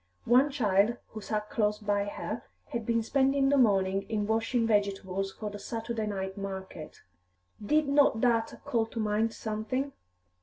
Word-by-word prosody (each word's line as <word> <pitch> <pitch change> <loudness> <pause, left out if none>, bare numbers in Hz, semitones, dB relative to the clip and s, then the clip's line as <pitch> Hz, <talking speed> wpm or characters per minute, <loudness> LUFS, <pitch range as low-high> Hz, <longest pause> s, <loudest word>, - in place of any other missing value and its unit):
One 255 +5 +5
child, 220 -4 +2
who 215 - -8
sat 210 0 -3
close 210 -1 +1
by 205 -1 0
her, 205 - -4 0.3
had 235 -6 -4
been 230 -1 +2
spending 270 +2 +2
the 285 - +4
morning 195 -4 +3
in 210 -2 0
washing 225 +2 +1
vegetables 195 -2 0
for 210 +1 -6
the 205 - -7
Saturday 225 -1 -3
night 190 -2 -3
market. 190 -5 -7 0.6
Did 300 +7 +2
not 280 -5 +4
that 230 -2 +1
call 235 -5 +1
to 230 - -6
mind 215 +1 +1
something? 225 +6 -3
220 Hz, 155 wpm, -29 LUFS, 205-240 Hz, 0.6 s, One